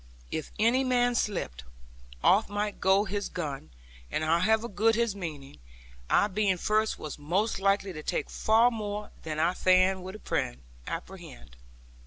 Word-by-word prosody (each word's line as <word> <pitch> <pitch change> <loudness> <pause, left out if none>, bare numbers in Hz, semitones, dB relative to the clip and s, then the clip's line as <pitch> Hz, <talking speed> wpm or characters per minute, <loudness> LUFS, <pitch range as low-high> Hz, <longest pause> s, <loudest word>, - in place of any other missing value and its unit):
If 155 - -4
any 235 +5 +3
man 245 -1 +2
slipped, 175 - -2 0.6
off 205 +4 +4
might 205 0 -3
go 190 +1 +4
his 200 0 -3
gun, 145 - -5 0.4
and 155 - -2
however 210 +8 +2
good 220 +2 +2
his 235 -3 0
meaning, 150 - -7 0.5
I - - +4
being 200 -2 +1
first 215 +4 +1
was 150 -1 -7
most 185 +10 0
likely 195 0 +1
to 155 - -7
take - - -2
far 225 +3 +3
more 210 -2 -5
than 155 -1 -5
I 165 +3 +2
fain 185 +1 +3
would 190 +3 -8 0.7
apprehend. - - -8
195 Hz, 145 wpm, -28 LUFS, 170-215 Hz, 0.7 s, off